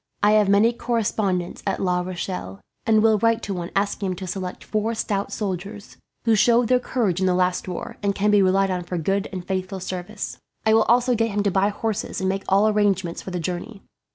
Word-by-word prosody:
I 210 - +6
have 210 -2 +4
many 210 +4 +4
correspondents 215 -6 -1
at 195 - 0
La 180 -1 +1
Rochelle, 95 - -5 0.3
and 220 -1 +4
will 220 -2 +4
write 230 +1 +2
to 200 - -3
one 175 -1 -4
asking 200 0 0
him 185 - -2
to 185 - -6
select 185 0 -5
four 220 +2 -1
stout 200 -2 -2
fellows, 200 +1 -5 0.3
who 230 - +4
showed 235 +2 +4
their 250 0 +4
courage 220 -8 -1
in 190 - +2
the 180 - +2
last 180 0 0
war, 180 - -6
and 200 -1 0
can 210 +1 +2
be 205 -1 +5
relied 195 +1 +3
on 180 -1 -1
for 175 +1 -4
good 195 +5 0
and 185 -2 -6
faithful 190 0 -3
service. 185 +3 -5 0.3
I 220 - +4
will 220 0 +5
also 245 +2 +3
get 225 0 +1
him 205 -1 -1
to 200 - +1
buy 195 +2 +2
horses, 220 +1 -3
and 190 - -1
make 195 +1 -2
all 200 +3 +4
arrangements 200 -5 +1
for - - -7
the 180 -1 -3
journey. 180 +5 -5
200 Hz, 220 wpm, -23 LUFS, 185-215 Hz, 0.3 s, I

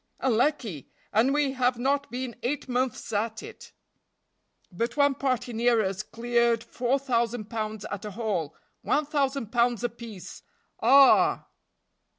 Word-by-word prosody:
"Unlucky! 240 - 0 0.2
and 230 +6 +3
we 290 -1 +1
have 250 -2 +1
not 280 +3 0
been 245 0 -5
eight 280 +3 -2
months 250 -2 -2
at 220 +2 -2
it." - - -11 1.0
"But 230 +10 -3
one 285 -1 +4
party 255 -3 -2
near 230 -1 +2
us 190 +1 -2
cleared 235 +1 0
four 245 +2 -1
thousand 235 -4 -1
pounds 215 -2 -4
at 205 +1 -6
a - - -4
haul; 195 -8 -3 0.3
one 300 - +1
thousand 275 -5 -1
pounds 240 -1 +1
apiece 225 -6 -7 0.4
ah!" 270 +4 +5
240 Hz, 135 wpm, -27 LUFS, 220-265 Hz, 1.0 s, ah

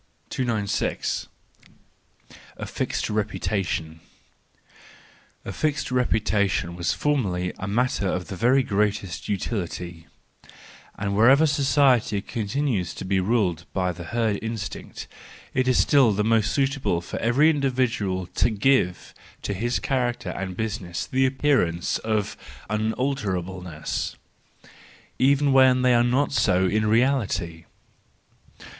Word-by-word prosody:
296. 110 -6 -1 1.3
A - - -5
Fixed - - -2
Reputation 95 -6 -2 1.5
.—A - - -4
fixed 150 -3 -1
reputation 105 -8 +1
was 85 -1 -1
formerly 95 -12 -1
a 95 - -4
matter 110 -1 0
of 90 -1 -2
the 100 - -6
very 125 +7 +3
greatest 100 - -1
utility; 90 -5 -4 0.9
and 100 0 -2
wherever 130 +9 +6
society 140 -7 +3
continues 110 -2 -2
to - - -6
be 95 0 +1
ruled 95 -5 0
by 90 -1 0
the 85 0 -8
herd 110 0 0
instinct, 110 -3 -6 0.5
it 130 0 +1
is 130 - +3
still 135 -6 +5
most 110 -1 +2
suitable 135 -10 0
for 85 - -6
every 135 +8 +4
individual 125 - 0
to 90 - 0
give 110 -4 +1 0.3
to 100 - -2
his 120 +5 -1
character 125 -3 -1
and 95 -2 -5
business 100 -6 -3
the 130 +1 +2
appearance 130 - +1
of 110 -2 -1 0.4
unalterableness,—even 110 - -3
when 130 -1 +5
they 125 -1 +5
are 120 0 +4
not 125 +4 +1
so 95 -9 +2
in 110 +4 +1
reality. 105 -9 0
110 Hz, 110 wpm, -24 LUFS, 95-130 Hz, 1.5 s, wherever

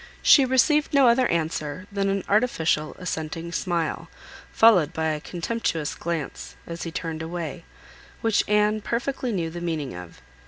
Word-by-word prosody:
She 275 - +7
received 290 +4 +2
no 275 -2 +6
other 245 +2 +4
answer, 160 0 -2
than 200 -1 0
an 195 -1 -1
artificial, 165 -9 +1
assenting 165 -2 -4
smile, 170 -2 -2 0.4
followed 180 -8 +5
by 160 -1 -1
a 155 -1 -2
contemptuous 170 -3 -2
glance, 165 -4 -5
as 170 0 -7
he 165 - -4
turned 165 -2 -4
away, 160 - -5 0.6
which 225 -2 +2
Anne 210 +1 +2
perfectly 250 +2 -2
knew 170 -5 -2
the 175 +1 -7
meaning 160 -6 -3
of. 90 -1 -10
175 Hz, 150 wpm, -24 LUFS, 160-215 Hz, 0.6 s, She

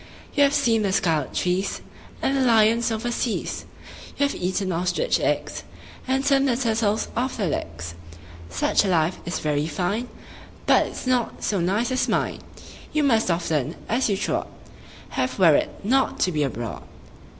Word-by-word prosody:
You 290 - +2
have 280 0 +5
seen 235 -6 +3
the 200 -2 +1
scarlet 165 -7 +1
trees 185 +2 -1 0.4
And 270 - +2
the 270 - +2
lions 230 -1 +4
over 225 +2 -2
seas; 235 -1 -2 0.5
You 285 - +3
have 280 - -1
eaten 185 +1 -1
ostrich 180 - 0
eggs, - - -1 0.5
And 265 +1 +1
turned 275 -1 +4
the 240 -3 +1
turtles 220 -3 0
off 250 +3 -1
their 200 -6 0
legs. 85 - -4 0.6
Such 95 - +2
a - - -1
life 170 -1 +1
is 175 - -1
very 150 0 0
fine, 190 +9 -2 0.6
But - - +4
it's - - -7
not 250 -2 0
so 200 - 0
nice 205 +8 0
as 255 - +1
mine: - - 0 0.5
You 305 - +1
must 225 -8 +3
often, 160 -3 0
as 235 +2 +1
you 200 - +1
trod, - - -1 0.6
Have - - -2
wearied - - +5
not 265 +6 +2
to 185 - +3
be 155 -3 -1
abroad. 120 -5 -3
215 Hz, 165 wpm, -24 LUFS, 175-250 Hz, 0.6 s, have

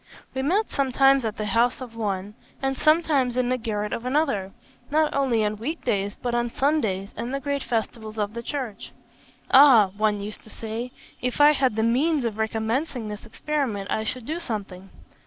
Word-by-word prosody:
We 265 - -2
met 380 +11 +1
sometimes 270 -1 +3
at 220 -1 -3
the 215 - -2
house 230 +4 +2
of 245 -3 -9
one, 205 -2 -3 0.3
and 270 0 -1
sometimes 300 -5 +2
in 250 -1 +1
the 255 - +1
garret 210 -2 -2
of 230 - -3
another; 250 -8 0 0.4
not 310 +1 +2
only 250 -6 +2
on 210 0 -1
week 300 +10 -5
days, 200 0 -1
but 245 -1 -2
on 240 0 +1
Sundays 225 -9 0
and 235 +3 -4
the 275 - -1
great 280 0 -2
festivals 220 -2 -3
of 210 0 -1
the 235 - -5
Church. 250 -4 -5 0.6
'Ah!' 255 -8 +8
one 210 0 +1
used 205 +1 -7
to - - -16
say, 225 +3 -5 0.3
'if 250 +2 -2
I 295 +1 +8
had 265 -6 +1
the 220 - +1
means 275 +6 +2
of 220 -2 -3
recommencing 225 +3 -1
this 210 +2 -8
experiment, 230 -5 -2
I 220 - 0
should 240 +2 -4
do 315 +5 -3
something.' 195 - -6
235 Hz, 190 wpm, -25 LUFS, 215-275 Hz, 0.6 s, Ah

